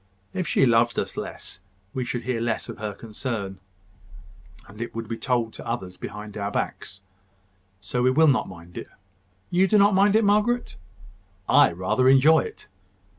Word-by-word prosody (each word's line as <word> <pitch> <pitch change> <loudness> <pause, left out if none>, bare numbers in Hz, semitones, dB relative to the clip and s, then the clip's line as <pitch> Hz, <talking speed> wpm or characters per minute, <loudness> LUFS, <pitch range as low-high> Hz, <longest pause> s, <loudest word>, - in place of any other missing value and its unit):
If 185 -3 -2
she 135 - +3
loved 120 -1 +3
us - - -2
less, - - -7 0.3
we 130 - -2
should 120 -1 -4
hear 120 -1 -2
less 115 -1 -2
of - - -8
her 105 -1 -3
concern, 105 -4 -5 1.1
and 105 +2 -11
it 120 - -5
would 115 -1 -5
be 115 - -3
told 115 -2 -1
to - - -10
others 95 -6 -4
behind 105 +2 -8
our 100 -1 -2
backs. 95 -1 -4 0.8
So 125 - -2
we 125 - +4
will 155 +5 +4
not 140 -5 +2
mind 85 -1 -10
it. - - -8 0.6
You 185 +2 +3
do 215 - +3
not 200 0 +5
mind 200 +2 +4
it, 220 - +4
Margaret?" 210 +4 +1 0.7
"I - - +6
rather 95 +9 +1
enjoy 145 +4 +6
it." - - -7
120 Hz, 175 wpm, -24 LUFS, 105-160 Hz, 1.1 s, I